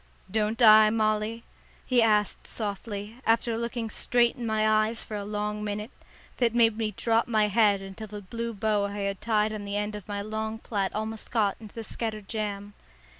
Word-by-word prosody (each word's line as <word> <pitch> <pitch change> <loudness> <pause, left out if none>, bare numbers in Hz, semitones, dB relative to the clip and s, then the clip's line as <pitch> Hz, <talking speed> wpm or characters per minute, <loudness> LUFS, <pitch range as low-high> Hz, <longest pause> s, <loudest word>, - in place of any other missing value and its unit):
"Don't 215 +2 0
I, 215 -1 +9
Molly?" 215 +1 0 0.4
he 250 -2 +3
asked 210 -2 +2
softly, 205 0 -5
after 230 0 +2
looking 235 -1 -3
straight 240 +1 +2
in 240 -2 -5
my 215 0 +2
eyes 215 +1 +2
for 215 - -7
a 205 - -3
long 210 +1 -3
minute, 210 +3 -4 0.5
that 235 -2 +2
made 230 -2 +4
me 220 -1 -1
drop 230 0 +2
my 215 -3 +2
head 205 -2 +3
until 195 +3 -8
the 210 0 -8
blue 230 +4 -5
bow 210 0 +1
I 200 0 -6
had 200 0 -2
tied 215 -1 +1
on 210 -1 -5
the 200 0 -3
end 210 0 -2
of 210 -3 -9
my 205 -1 -3
long 220 +1 -3
plait 200 -4 -2
almost 220 +1 -4
got 210 -4 +1
into 215 -2 -12
the 225 - -5
scattered 215 -2 -4
jam. 205 -2 -4
215 Hz, 190 wpm, -27 LUFS, 210-225 Hz, 0.5 s, I